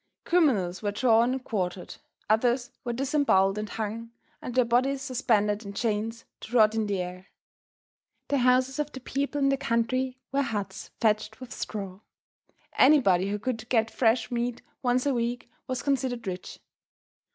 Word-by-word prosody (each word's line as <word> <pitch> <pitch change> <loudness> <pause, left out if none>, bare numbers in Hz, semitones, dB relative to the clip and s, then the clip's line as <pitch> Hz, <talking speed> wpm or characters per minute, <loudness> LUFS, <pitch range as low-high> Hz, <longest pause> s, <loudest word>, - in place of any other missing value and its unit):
Criminals 230 - +2
were 205 -1 -1
drawn 230 +2 +3
and 265 -1 -4
quartered; 185 -5 -3 0.3
others 240 +3 +2
were 240 - -2
disemboweled 245 -7 +2
and 210 0 -4
hung 225 +1 -4 0.3
and 250 - -6
their 255 -1 +4
bodies 260 +3 +1
suspended 220 -5 +1
in 200 -1 -7
chains 225 +1 -2
to 245 +3 -2
rot 215 -1 +6
in 220 -1 0
the 200 -2 -1
air. 180 +1 -6 1.0
The 280 - +2
houses 255 +2 +3
of 295 0 -1
the 265 - -6
people 280 +3 -2
in 275 -1 +3
the 275 - +2
country 255 0 0
were 275 +1 +2
huts, 205 -6 -4
thatched 215 -1 +1
with 255 -2 -8
straw. 195 -3 -5 0.8
Anybody 200 -10 +5
who 205 - -1
could 225 +1 -4
get 225 -2 +2
fresh 230 0 +2
meat 240 0 -2 0.2
once 250 0 +1
a 280 - +2
week 240 0 -2 0.2
was 255 -1 -3
considered 255 -4 -1
rich. 185 -1 -6
235 Hz, 160 wpm, -27 LUFS, 210-255 Hz, 1.0 s, rot